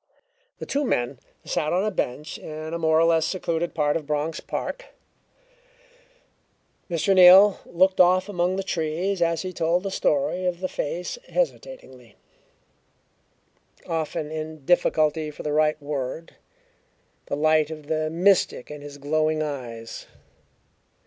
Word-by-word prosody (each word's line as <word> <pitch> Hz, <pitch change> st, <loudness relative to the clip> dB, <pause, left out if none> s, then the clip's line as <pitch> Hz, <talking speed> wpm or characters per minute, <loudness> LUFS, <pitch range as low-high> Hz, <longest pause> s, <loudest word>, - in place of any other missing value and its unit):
The -, -, -7 dB
two 285 Hz, +2 st, -1 dB
men 125 Hz, -, -1 dB, 0.3 s
sat 155 Hz, -, -1 dB
on 185 Hz, +3 st, +1 dB
a 215 Hz, -, 0 dB
bench 150 Hz, -3 st, -4 dB
in 155 Hz, +1 st, -7 dB
a 170 Hz, -, -2 dB
more 160 Hz, -1 st, +3 dB
or -, -, +4 dB
less 165 Hz, -1 st, +3 dB
secluded 170 Hz, -1 st, -2 dB
part 150 Hz, -2 st, +1 dB
of 155 Hz, -3 st, -3 dB
Bronx 150 Hz, +2 st, -2 dB
Park. -, -, -5 dB, 2.0 s
Mr. 175 Hz, +3 st, +1 dB
Neal 190 Hz, +2 st, +8 dB
looked 185 Hz, +2 st, +3 dB
off 185 Hz, +2 st, +4 dB
among 180 Hz, -2 st, 0 dB
the 195 Hz, -, -2 dB
trees 175 Hz, +2 st, -2 dB
as 165 Hz, -1 st, +1 dB
he 185 Hz, 0 st, -5 dB
told 170 Hz, +2 st, 0 dB
the 195 Hz, -, -3 dB
story 180 Hz, +4 st, 0 dB
of 175 Hz, -1 st, -2 dB
the 185 Hz, -, -2 dB
face 180 Hz, -, -4 dB
hesitatingly, -, -, -4 dB, 1.7 s
often 160 Hz, -1 st, -3 dB
in 155 Hz, -2 st, -6 dB
difficulty 155 Hz, -2 st, +2 dB
for 150 Hz, -, -9 dB
the 150 Hz, -, -2 dB
right 155 Hz, 0 st, +2 dB
word, 145 Hz, +2 st, -5 dB, 0.9 s
the -, -, -2 dB
light 155 Hz, 0 st, +3 dB
of 155 Hz, -2 st, -8 dB
the 155 Hz, +1 st, -1 dB
mystic 175 Hz, -5 st, +2 dB
in 150 Hz, -1 st, -8 dB
his 145 Hz, 0 st, -10 dB
glowing 155 Hz, +2 st, 0 dB
eyes. 120 Hz, -6 st, -7 dB
160 Hz, 140 wpm, -24 LUFS, 150-180 Hz, 2.0 s, Neal